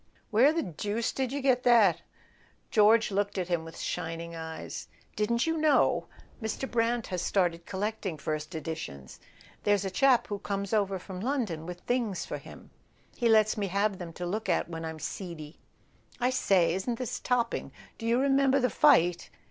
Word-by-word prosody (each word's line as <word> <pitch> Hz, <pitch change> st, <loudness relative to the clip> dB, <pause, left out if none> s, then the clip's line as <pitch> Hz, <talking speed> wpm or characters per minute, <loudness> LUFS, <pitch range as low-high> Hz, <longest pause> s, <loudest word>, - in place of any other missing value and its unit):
"Where 240 Hz, +7 st, +6 dB
the 330 Hz, +1 st, -1 dB
deuce 205 Hz, +6 st, -2 dB
did 260 Hz, -2 st, -2 dB
you 285 Hz, +1 st, -2 dB
get 255 Hz, -2 st, +3 dB
that?" 230 Hz, -8 st, +5 dB, 0.7 s
George 220 Hz, -1 st, +5 dB
looked 200 Hz, +1 st, -1 dB
at 185 Hz, -1 st, -2 dB
him 170 Hz, -2 st, 0 dB
with 165 Hz, 0 st, -10 dB
shining 165 Hz, +1 st, -4 dB
eyes. 160 Hz, 0 st, -6 dB, 0.3 s
"Didn't 235 Hz, +3 st, +1 dB
you 325 Hz, 0 st, 0 dB
know? 305 Hz, -1 st, +3 dB, 0.3 s
Mr. 220 Hz, +4 st, -3 dB
Brant 235 Hz, -1 st, 0 dB
has 180 Hz, -2 st, -3 dB
started 175 Hz, -3 st, 0 dB
collecting 200 Hz, -3 st, -3 dB
first 155 Hz, +1 st, -3 dB
edi¬ 160 Hz, 0 st, -3 dB
tions. 70 Hz, -, -9 dB, 0.4 s
There's 205 Hz, -1 st, +2 dB
a 190 Hz, -, -2 dB
chap 260 Hz, +3 st, +4 dB
who 205 Hz, -1 st, -4 dB
comes 200 Hz, 0 st, -3 dB
over 200 Hz, -3 st, +1 dB
from 185 Hz, 0 st, -8 dB
London 210 Hz, -, -2 dB
with 180 Hz, 0 st, -7 dB
things 235 Hz, -6 st, -1 dB
for -, -, -5 dB
him. -, -, -13 dB, 0.4 s
He 235 Hz, -, +1 dB
lets 215 Hz, 0 st, +4 dB
me 205 Hz, -2 st, -1 dB
have 200 Hz, +1 st, 0 dB
them 175 Hz, -2 st, -6 dB
to 175 Hz, -, -5 dB
look 215 Hz, +5 st, -3 dB
at -, -, +1 dB
when 165 Hz, -1 st, -6 dB
I'm 160 Hz, 0 st, -5 dB
seedy. 160 Hz, -2 st, -7 dB, 0.6 s
I 250 Hz, +1 st, +2 dB
say, 185 Hz, -9 st, +3 dB
isn't 210 Hz, +6 st, -2 dB
this 250 Hz, -2 st, -4 dB
topping? 245 Hz, -2 st, -1 dB, 0.3 s
Do 225 Hz, -, -4 dB
you 235 Hz, +1 st, +3 dB
re¬ 275 Hz, +2 st, +2 dB
member 275 Hz, 0 st, +4 dB
the 250 Hz, -1 st, +1 dB
fight?" 175 Hz, -, +4 dB
205 Hz, 180 wpm, -29 LUFS, 175-240 Hz, 0.7 s, Where